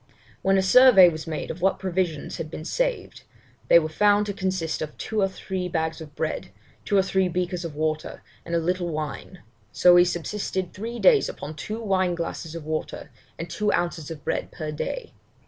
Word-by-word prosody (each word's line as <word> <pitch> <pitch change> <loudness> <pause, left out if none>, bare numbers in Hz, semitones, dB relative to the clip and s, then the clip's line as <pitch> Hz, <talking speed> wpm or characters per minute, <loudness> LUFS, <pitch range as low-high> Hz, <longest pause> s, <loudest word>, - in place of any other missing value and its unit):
'When 195 0 +3
a 190 - +2
survey 195 -3 +8
was 160 -1 -6
made 155 -1 -4
of 170 - -9
what 190 +1 +2
provisions 180 -5 -2
had 155 - -5
been 155 - -7
saved, - - -2 0.5
they - - +8
were 160 -2 +2
found 205 +5 +3
to 205 - -3
consist 185 -4 -2
of 150 -1 -5
two 220 -1 -2
or 195 - +3
three 190 -1 -4
bags 160 -1 -2
of 150 -2 -11
bread, - - -3 0.4
two 205 - +2
or 190 - +5
three 190 0 +1
breakers 180 0 -2
of 165 -3 -6
water, 155 0 -3 0.2
and 170 - -3
a - - +4
little 175 +1 -1
wine; 155 +3 -6 0.3
so 180 +9 +6
we 175 0 +8
subsisted 180 +1 -3
three 230 +4 -6
days 455 - +5
upon 155 - -7
two 215 +8 -5
wine 185 -5 +1
glasses 165 -1 -5
of 165 -3 -7
water, 155 0 -4 0.3
and 165 - -5
two 210 +2 -1
ounces 170 -3 -2
of 160 -3 -9
bread - - -2
per 155 -3 -5
day. 450 - -5
180 Hz, 200 wpm, -25 LUFS, 160-195 Hz, 0.5 s, survey